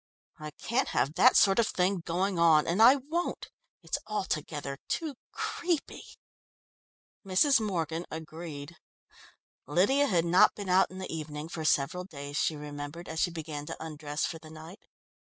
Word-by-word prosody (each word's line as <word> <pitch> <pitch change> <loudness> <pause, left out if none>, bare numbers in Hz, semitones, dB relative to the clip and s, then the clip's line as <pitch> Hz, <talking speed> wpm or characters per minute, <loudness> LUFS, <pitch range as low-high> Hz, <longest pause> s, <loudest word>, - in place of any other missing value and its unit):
I 155 0 -6
can't 250 +4 0
have 145 - 0
that 255 +8 +5
sort 195 +2 +5
of 230 - +3
thing 185 +1 +1
going 175 +2 -1
on, 160 -2 +5
and 180 +6 +1
I 245 +4 +9
won't! 305 +6 -3 0.3
it's - - -2
altogether 150 -8 -3
too 320 -4 -2 0.2
creepy!" 345 -4 -2 1.2
Mrs. 210 +9 +4
Morgan 170 -5 -2
agreed. 160 -1 -8 0.9
Lydia 205 - +3
had 170 -6 +2
not 175 +2 +5
been 200 -2 -6
out 185 +1 +4
in 185 - -10
the 190 -2 -5
evening 150 0 -6
for 160 -2 -5
several 155 +4 +1
days, 145 -5 -8
she 155 - +1
remembered, 145 +3 -7
as 160 0 -4
she 175 - +2
began 155 -3 -6
to - - -5
undress 150 -1 -4
for 165 - -5
the 155 - -13
night. 160 +5 -11
170 Hz, 155 wpm, -29 LUFS, 155-195 Hz, 1.2 s, I